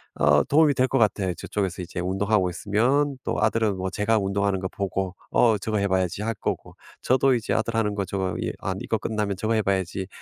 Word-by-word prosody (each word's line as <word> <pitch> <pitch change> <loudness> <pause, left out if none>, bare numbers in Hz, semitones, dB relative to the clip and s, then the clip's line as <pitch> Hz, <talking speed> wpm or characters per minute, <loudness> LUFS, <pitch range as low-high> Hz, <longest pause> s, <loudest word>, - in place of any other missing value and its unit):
어 - - +4
도움이 150 0 +4
될 130 +1 +3
것 135 - +1
같아요. 100 -5 +1
저쪽에서 95 -2 -3
이제 90 0 -5
운동하고 95 +1 +1
있으면 125 - +1
또 - - -2
아들은 110 -4 +1
뭐 95 0 -2
제가 105 +3 +1
운동하는 100 0 0
거 95 - -1
보고 95 -1 -3 0.2
'어 115 -3 +4
저거 110 +2 -2
해 100 - +1
봐야지.' 95 +1 0
할 115 +1 -1
거고 - - -4 0.3
저도 130 +1 +3
이제 115 - -2
아들 115 +1 -1
하는 105 -2 +1
거 100 -2 -1
저거 95 -2 -2
이 - - -2
'아 - - -2
이거 - - -1
끝나면 105 -2 -2
저거 110 +3 0
해 110 - +2
봐야지.' 95 -1 -1
100 Hz, 410 characters per minute, -25 LUFS, 95-110 Hz, 0.3 s, 어